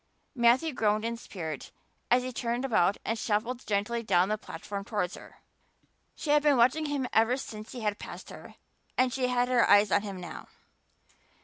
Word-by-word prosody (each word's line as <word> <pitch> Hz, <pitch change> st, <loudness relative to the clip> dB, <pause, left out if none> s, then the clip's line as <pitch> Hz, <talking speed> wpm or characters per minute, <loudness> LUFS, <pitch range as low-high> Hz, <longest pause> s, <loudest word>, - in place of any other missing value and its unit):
Matthew 260 Hz, +5 st, +3 dB
groaned 215 Hz, -2 st, +1 dB
in 230 Hz, 0 st, -1 dB
spirit 160 Hz, -, -7 dB, 0.4 s
as 250 Hz, +1 st, +4 dB
he 255 Hz, 0 st, -5 dB
turned 240 Hz, +2 st, -2 dB
about 205 Hz, -6 st, +2 dB
and 225 Hz, 0 st, -1 dB
shuffled 230 Hz, +4 st, -2 dB
gently 210 Hz, +3 st, 0 dB
down 185 Hz, -4 st, +2 dB
the 215 Hz, -, 0 dB
platform 200 Hz, +2 st, -6 dB
towards 195 Hz, -4 st, -2 dB
her. -, -, -13 dB, 0.7 s
She 295 Hz, -, -2 dB
had 295 Hz, 0 st, +5 dB
been 290 Hz, -2 st, +4 dB
watching 260 Hz, +6 st, +3 dB
him 280 Hz, -3 st, -1 dB
ever 225 Hz, +3 st, +3 dB
since 215 Hz, -4 st, -8 dB
he 245 Hz, -, -6 dB
had 210 Hz, -1 st, -1 dB
passed -, -, -9 dB
her -, -, -11 dB, 0.4 s
and 255 Hz, -1 st, +3 dB
she 255 Hz, -1 st, 0 dB
had 245 Hz, 0 st, +1 dB
her 250 Hz, -1 st, +3 dB
eyes 205 Hz, -1 st, +6 dB
on -, -, +4 dB
him 200 Hz, -3 st, -6 dB
now. 175 Hz, -3 st, -8 dB
230 Hz, 185 wpm, -29 LUFS, 205-250 Hz, 0.7 s, eyes